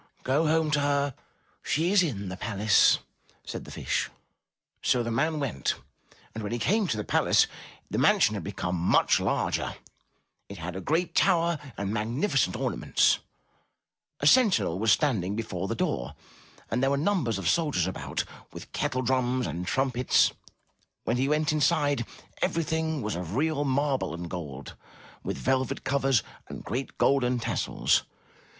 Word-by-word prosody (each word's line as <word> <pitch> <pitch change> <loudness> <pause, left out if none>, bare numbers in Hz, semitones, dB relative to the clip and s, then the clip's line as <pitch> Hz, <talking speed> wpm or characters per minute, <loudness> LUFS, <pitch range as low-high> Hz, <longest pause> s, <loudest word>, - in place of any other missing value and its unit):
'' - - -43
'*Go 145 +5 +2
home 160 0 +2
to 150 - +3
her; 140 -1 +1 0.5
she 165 +5 0
is 205 -2 +5
in 105 - -2
the 90 - -5
palace, 105 +1 +3 0.5
said - - -6
the - - -10
Fish. - - -1 0.7
So 125 -2 +2
the 115 - -3
man 155 +7 0
went 120 - -1 0.6
and 110 - -5
when 105 - -4
he 120 - -1
came 205 - +1
to 110 - -1
the 105 - -2
palace, - - +3 0.4
the - - -2
mansion - - +4
had - - -4
become 90 +1 -3
much 85 +1 +3
larger; - - -1 0.7
it 100 - -8
had 85 +1 -6
a 95 - -4
great 165 - 0
tower 170 -4 +3 0.2
and 100 +1 -2
magnificent 115 - 0
ornaments; - - +2 1.0
a - - -2
sentinel 200 - +4
was 110 +1 +3
standing 105 - +1
before 100 -5 -3
the - - -2
door, - - -2 0.6
and 120 +3 0
there 135 - +3
were 140 - +1
numbers 150 - 0
of 95 -3 -3
soldiers 145 - +2
about, 95 - -3 0.3
with - - -10
kettle 130 +1 -1
drums 130 0 +1
and 85 +3 -4
trumpets. 130 -2 +2 0.7
When 120 - 0
he 135 +2 +1
went 150 0 +2
inside, 145 -4 +1 0.3
everything 160 -2 -1
was 105 -2 -2
of 90 +2 -5
real 150 +1 +1
marble 135 - 0
and 85 0 -6
gold, 75 -6 -7 0.5
with - - -4
velvet 130 -1 0
covers 135 -3 +2 0.2
and - - -8
great 130 +6 -4
golden 125 -2 +2
tassels. 115 - +1
130 Hz, 155 wpm, -27 LUFS, 100-150 Hz, 1.0 s, is